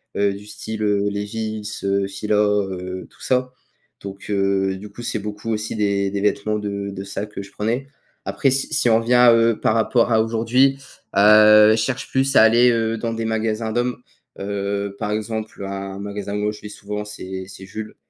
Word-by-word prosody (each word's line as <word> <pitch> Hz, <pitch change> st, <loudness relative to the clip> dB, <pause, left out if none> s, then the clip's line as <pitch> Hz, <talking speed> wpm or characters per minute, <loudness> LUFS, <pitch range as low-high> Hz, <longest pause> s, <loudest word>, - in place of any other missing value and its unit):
Heu, 100 Hz, 0 st, +2 dB
du 100 Hz, +1 st, -11 dB
style, 110 Hz, +1 st, -5 dB
heu, 105 Hz, -1 st, +1 dB
Levi's, 105 Hz, +1 st, -4 dB
heu, 100 Hz, 0 st, +1 dB
Fila, 105 Hz, +2 st, -2 dB
heu, 95 Hz, -3 st, -1 dB
tout -, -, -23 dB
ça. 125 Hz, 0 st, 0 dB, 0.5 s
Donc 100 Hz, 0 st, -9 dB
heu, 95 Hz, -1 st, +1 dB
du 105 Hz, +2 st, -10 dB
coup 120 Hz, -, -10 dB
c'est 115 Hz, -, -2 dB
beaucoup 105 Hz, +2 st, -6 dB
aussi 110 Hz, 0 st, -3 dB
des 100 Hz, -2 st, 0 dB
des 100 Hz, -, -2 dB
vêtements 105 Hz, +1 st, 0 dB
de 100 Hz, -1 st, -4 dB
de 95 Hz, 0 st, -6 dB
ça 100 Hz, +1 st, -4 dB
que 105 Hz, -1 st, -8 dB
je 100 Hz, 0 st, -12 dB
prenais. 115 Hz, +7 st, -2 dB, 0.4 s
Après 135 Hz, -, +1 dB
si 135 Hz, +3 st, -1 dB
si 145 Hz, -5 st, +1 dB
on 110 Hz, -, +5 dB
revient, 125 Hz, +1 st, +4 dB
heu, 115 Hz, -1 st, +3 dB
par -, -, +2 dB
rapport 115 Hz, +1 st, +2 dB
à 110 Hz, -, +4 dB
aujourd'hui, 120 Hz, +4 st, +2 dB, 0.4 s
heu, 105 Hz, +1 st, +7 dB
je -, -, +4 dB
cherche 120 Hz, +4 st, -2 dB
plus 135 Hz, +1 st, +1 dB
à -, -, +8 dB
aller, 120 Hz, +2 st, +6 dB
heu, 115 Hz, -1 st, 0 dB
dans 115 Hz, +1 st, -3 dB
des 115 Hz, 0 st, -3 dB
magasins 110 Hz, 0 st, -1 dB
d'hommes, 120 Hz, +2 st, -1 dB, 0.4 s
heu, 100 Hz, 0 st, -3 dB
par 105 Hz, -, -2 dB
exemple 110 Hz, -1 st, -4 dB
un 95 Hz, 0 st, -5 dB
magasin 100 Hz, 0 st, -5 dB
moi 105 Hz, 0 st, 0 dB
où -, -, -1 dB
je 105 Hz, -, -12 dB
vais 105 Hz, -, -8 dB
souvent 105 Hz, 0 st, -6 dB
c'est 95 Hz, -2 st, -7 dB
c'est 95 Hz, 0 st, -11 dB
Jules. 110 Hz, +2 st, -7 dB
105 Hz, 200 wpm, -21 LUFS, 100-115 Hz, 0.5 s, à